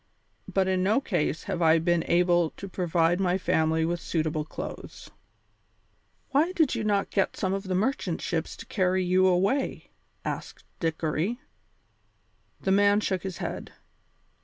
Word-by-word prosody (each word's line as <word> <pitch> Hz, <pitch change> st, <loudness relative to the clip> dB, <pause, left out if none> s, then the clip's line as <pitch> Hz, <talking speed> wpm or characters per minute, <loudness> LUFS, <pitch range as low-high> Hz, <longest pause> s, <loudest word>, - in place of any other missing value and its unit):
But 190 Hz, -1 st, +2 dB
in 185 Hz, -1 st, +1 dB
no 205 Hz, +7 st, +3 dB
case 175 Hz, -, -1 dB
have 175 Hz, -, -3 dB
I 160 Hz, 0 st, +5 dB
been 170 Hz, 0 st, +1 dB
able 175 Hz, -1 st, +3 dB
to 195 Hz, -, -7 dB
provide 175 Hz, -1 st, +1 dB
my 185 Hz, -1 st, +2 dB
family 160 Hz, -3 st, +1 dB
with 170 Hz, +1 st, -2 dB
suitable 155 Hz, -2 st, -1 dB
clothes." 155 Hz, -, -8 dB, 1.2 s
"Why 315 Hz, +6 st, +2 dB
did 320 Hz, -7 st, +2 dB
you 230 Hz, -3 st, -2 dB
not 205 Hz, -2 st, 0 dB
get 195 Hz, -, 0 dB
some 190 Hz, 0 st, 0 dB
of 195 Hz, -, -1 dB
these 185 Hz, -1 st, -1 dB
merchant 200 Hz, -5 st, -1 dB
ships 165 Hz, -2 st, -3 dB
to -, -, -9 dB
carry 185 Hz, -2 st, +1 dB
you 185 Hz, +1 st, +4 dB
away?" 195 Hz, +9 st, 0 dB, 0.3 s
asked -, -, -5 dB, 0.2 s
Dickory. 165 Hz, +7 st, -1 dB, 1.2 s
The 190 Hz, -, 0 dB
man 205 Hz, +1 st, +5 dB
shook 190 Hz, -4 st, -1 dB
his 190 Hz, -3 st, -5 dB
head. -, -, -5 dB
185 Hz, 150 wpm, -27 LUFS, 165-195 Hz, 1.2 s, I